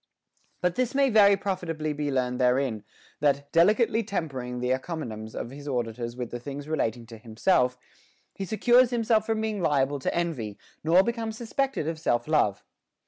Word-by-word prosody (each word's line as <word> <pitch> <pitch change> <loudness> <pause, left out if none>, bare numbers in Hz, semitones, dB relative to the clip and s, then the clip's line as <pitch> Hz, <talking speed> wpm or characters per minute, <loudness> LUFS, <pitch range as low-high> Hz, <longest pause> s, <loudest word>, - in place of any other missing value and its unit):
9. 180 - +4
But - - -20
this 255 0 0
may 275 -2 +3
very 200 -2 +6
profitably 170 -6 -3
be 145 0 -2
learned 125 -2 -1
therein, 125 -3 +1 0.4
that, 140 -1 +1
delicately 215 +6 +4
tempering 135 - -4
the 125 +1 -1
encomiums 125 -6 -4
of 120 - -5
his 145 +1 -10
auditors 120 -2 -3
with 125 -2 -5
the 120 - -4
things 140 +3 -7
relating 120 -7 -1
to 115 -1 -11
himself, 125 - +1 0.6
he 195 - -5
secures 240 +4 +4
himself 225 -2 +1
from 220 -1 0
being 215 -3 -2
liable 145 -3 +1
to - - -1
envy, 135 -12 -2 0.3
nor 170 +4 +5
becomes 230 -1 -3
suspected 250 - -2
of 165 -1 -3
self 120 -5 0
love. 110 -11 +1
150 Hz, 170 wpm, -27 LUFS, 125-205 Hz, 0.6 s, very